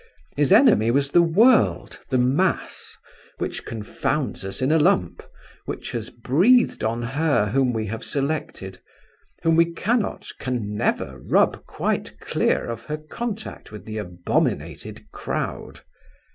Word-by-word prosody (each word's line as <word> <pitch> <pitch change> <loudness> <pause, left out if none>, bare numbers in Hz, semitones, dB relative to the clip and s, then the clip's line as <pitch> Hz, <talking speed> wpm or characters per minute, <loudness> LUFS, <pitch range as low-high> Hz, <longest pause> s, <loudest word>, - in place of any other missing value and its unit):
His 145 +3 +1
enemy 210 - +6
was 140 +3 +1
the 175 - +6
world, 215 +9 +3
the 130 - +1
mass, 135 +10 0 0.4
which - - -4
confounds 115 +4 -3
us 95 0 -5
in 130 +3 +1
a 160 - +4
lump, 150 - +2 0.4
which - - -6
has 115 -2 -4
breathed 180 - +3
on 115 +2 -1
her 135 -4 +1
whom 130 0 +2
we 110 -2 -2
have 115 +3 -5
selected, 135 -10 -3 0.6
whom 165 0 +3
we 170 +1 +4
cannot, 220 +6 -1
can 115 -5 -3
never, - - -1
rub - - +1
quite - - -3
clear - - 0
of 115 0 -6
her 150 - -3
contact 215 - -6
with 105 -4 -10
the 110 0 -5
abominated 90 -3 -2
crowd. - - -5
135 Hz, 135 wpm, -23 LUFS, 110-170 Hz, 0.6 s, enemy